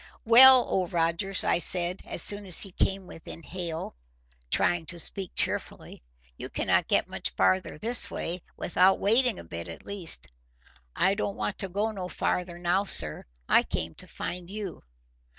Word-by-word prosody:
"Well, 255 +3 +8
Old 185 -2 -2
Rogers," 170 +3 0
I - - +1
said, 175 +1 +5
as - - -3
soon 205 -1 -2
as 180 - +5
he 195 - -1
came 195 +1 -2
within 165 -1 -11
hail, 170 -2 -6 0.6
trying 170 - 0
to 175 - 0
speak 190 +3 -2
cheerfully, - - -3 0.3
"you - - -8
cannot - - 0
get - - +1
much - - -2
farther 95 +7 0
this 235 +8 +2
way—without 180 +2 -1
wading 230 +2 +2
a - - -9
bit, 85 +1 -8
at 85 - -11
least." 190 - -3 0.7
"I 190 - +2
don't 200 -1 -4
want 205 - -4
to 195 - -2
go 205 +4 -2
no 190 -4 -6
farther 180 -1 -3
now, 175 +3 0
sir. 75 - +4 0.3
I - - +5
came 80 0 -5
to 185 - -9
find 175 0 -7
you." 205 -3 -7
180 Hz, 165 wpm, -27 LUFS, 170-200 Hz, 0.7 s, Well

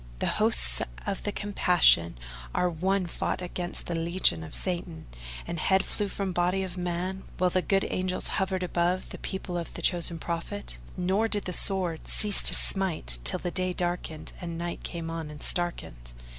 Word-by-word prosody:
The - - -2 0.2
hosts - - +4 0.2
of 195 - -2
the 205 - -2
Compassion 180 - +3 0.4
are 180 0 +2
One 185 +3 0
fought 170 - -2
against 175 -1 -4
the 175 - -3
legions 165 - +2
of 80 - -3
Satan; 175 -3 -2 0.4
and 170 - -4
head 190 +4 +3
flew 205 - -1
from 195 -1 -3
body 180 +2 +1
of 185 -2 -6
man, 180 +1 -3 0.2
while 180 0 +2
the 185 - +2
good 195 +1 +1
Angels 185 0 -2
hovered 190 -1 -1
above 180 +1 0
the - - -8
people 185 -2 -4
of 170 - -6
the - - -6
Chosen 170 -2 +3
Prophet, 170 +5 -5 0.2
nor 190 +5 +1
did 205 -3 0
the 180 - -2
sword 180 -3 +3
cease 210 -2 +4
to - - +6
smite 165 - +1
till 60 - +4
the 175 - -4
day 185 0 -1
darkened 175 -3 -3
and 170 -2 -5
night 170 0 -4
came 165 -2 -5
on 165 -2 -5
and 150 -1 -9
starkened. - - -3
180 Hz, 180 wpm, -28 LUFS, 165-190 Hz, 0.4 s, to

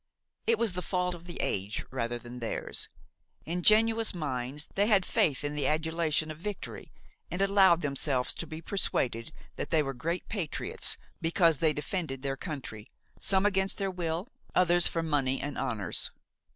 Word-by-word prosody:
It 230 - +4
was 225 -4 +1
the 180 - -2
fault 180 0 0
of 175 0 -10
the 175 -1 -8
age 100 +2 -1
rather 120 -2 -1
than 120 +1 -9
theirs. 115 - -2 0.6
Ingenuous 215 +5 +4
minds, 140 -2 -2
they 200 +1 +2
had 200 -5 +4
faith 145 -2 +2
in 145 0 -2
the 150 -1 0
adulation 155 0 +1
of 155 - -9
victory, 170 - -6 0.4
and 180 - -4
allowed 195 -3 +5
themselves 140 -2 0
to - - -5
be 160 +1 -7
persuaded 125 - -1 0.3
that - - -3
they 160 -2 +3
were 135 -1 -3
great 165 +8 -3
patriots 185 -8 -1 0.2
because 165 -2 +3
they 160 -2 +4
defended 150 -3 -3
their 135 -1 -1
country–some 140 - -3
against 195 -1 +1
their 195 -1 -1
will, 175 +1 -2 0.3
others 175 -1 +5
for 165 - -1
money 140 -4 +1
and 145 - -4
honors. 110 -9 0
160 Hz, 160 wpm, -30 LUFS, 135-185 Hz, 0.6 s, allowed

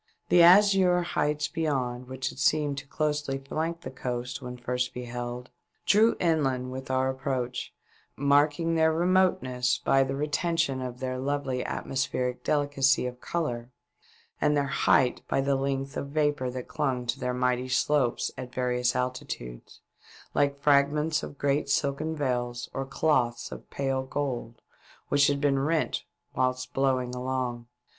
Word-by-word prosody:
The 175 0 +6
azure 185 0 +6
heights 150 -3 0
beyond, 130 -6 -2
which 130 0 -3
had - - -10
seemed 145 -1 +2
to 140 - -13
closely 150 -2 -1
flank 160 +5 -3
the - - -7
coast 125 -1 -4
when 125 0 -7
first 125 +1 -2
beheld, 125 0 -5 0.3
drew 220 +3 +5
Inland 135 -7 +1
with 130 +1 -7
our 130 0 +1
approach, 130 -2 -3 0.4
marking 145 +4 +2
their 160 -1 +4
remoteness 165 -8 +2
by 135 - +3
the 135 +1 -3
retention 150 -1 0
of 125 0 -6
their 130 -1 -2
lovely 135 -1 -1
atmospheric 125 -1 -2
delicacy 145 -3 +2
of 125 0 -6
colour, 120 -8 -3 0.7
and 150 0 +3
their 140 - +2
height 130 -2 +2
by - - +1
the 140 +1 +1
lengths 135 +1 -2
of 140 - -3
vapour 145 -3 0
that 125 0 -6
clung 130 -5 -1
to 120 - -2
their 125 0 -2
mighty 125 0 0
slopes 130 -1 +1
at 125 -1 -6
various 125 -1 0
altitudes, 125 - -5 0.5
like 140 0 +1
fraofments 150 +2 +3
of 145 - -8
ereat 140 0 0
silken 140 +3 0
veils 120 -4 -2
or 135 0 -3
cloths 135 -4 0
of - - -9
pale 135 -1 -1
gold 130 -4 -4 0.5
which 145 0 +4
had 145 -1 +1
been 140 -1 +2
rent 155 +3 0 0.3
whilst 130 0 -1
blowing 130 -2 +1
along. 125 -2 -3
135 Hz, 145 wpm, -28 LUFS, 125-150 Hz, 0.7 s, The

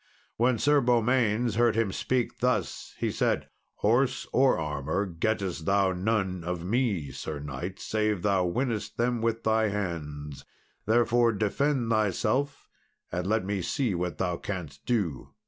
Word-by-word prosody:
When 120 +1 +2
Sir 145 +5 +4
Beaumains 120 -2 +2
heard 120 -2 +4
him 110 -3 +1
speak 125 +4 -1
thus, 125 +1 -1
he - - -1
said, - - 0 0.3
"Horse 125 +5 +1
or 130 +1 +4
armour 75 +4 -2
gettest 95 -2 -2
thou 100 -1 +3
none 95 -2 -1
of 85 0 -3
me, 100 - 0
Sir 75 +4 -5
knight, 75 +6 -6
save 105 -4 -1
thou 95 -3 +2
winnest 115 +3 -2
them 120 0 +1
with 115 0 0
thy 110 0 +3
hands; 75 -8 -4 0.4
therefore 120 +1 +3
defend 115 +4 0
thyself, 110 +7 0 0.4
and 90 +1 -2
let 110 -1 +1
me 100 -1 -1
see 125 - 0
what 90 -2 -2
thou 90 -2 -1
canst 85 -8 -6
do." 100 - -1
105 Hz, 145 wpm, -28 LUFS, 90-120 Hz, 0.4 s, Sir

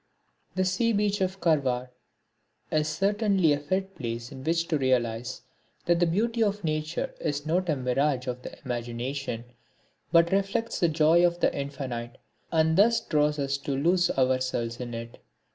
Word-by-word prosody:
The 185 0 +1
sea 230 +5 +1
beach 205 -1 +1
of 190 +1 -1
Karwar 130 -7 +1 0.8
is 155 0 +1
certainly 195 -1 +2
a 145 - -1
fit 190 +6 -2
place 120 -1 -5
in 130 -2 -9
which 165 +2 0
to 155 -4 +1
realise 120 -2 0 0.4
that 170 -1 +3
the 175 - +3
beauty 225 +7 0
of 205 -2 +1
Nature 155 +1 -2
is 145 -2 -2
not 175 +3 0
a 155 - +3
mirage 130 +1 0
of 125 0 -4
the - - -9
imagination, 120 0 -3 0.7
but 170 0 +5
reflects 200 +4 0
the 170 - +3
joy 160 +2 +4
of 175 0 +2
the - - +2
Infinite 130 -4 -5 0.3
and 160 +1 +3
thus 230 +3 +5
draws 150 -1 +1
us 140 -1 -1
to 140 0 -3
lose 175 +4 +3
ourselves 130 -3 0
in 120 -2 -5
it. 115 0 -8
155 Hz, 160 wpm, -27 LUFS, 130-180 Hz, 0.8 s, but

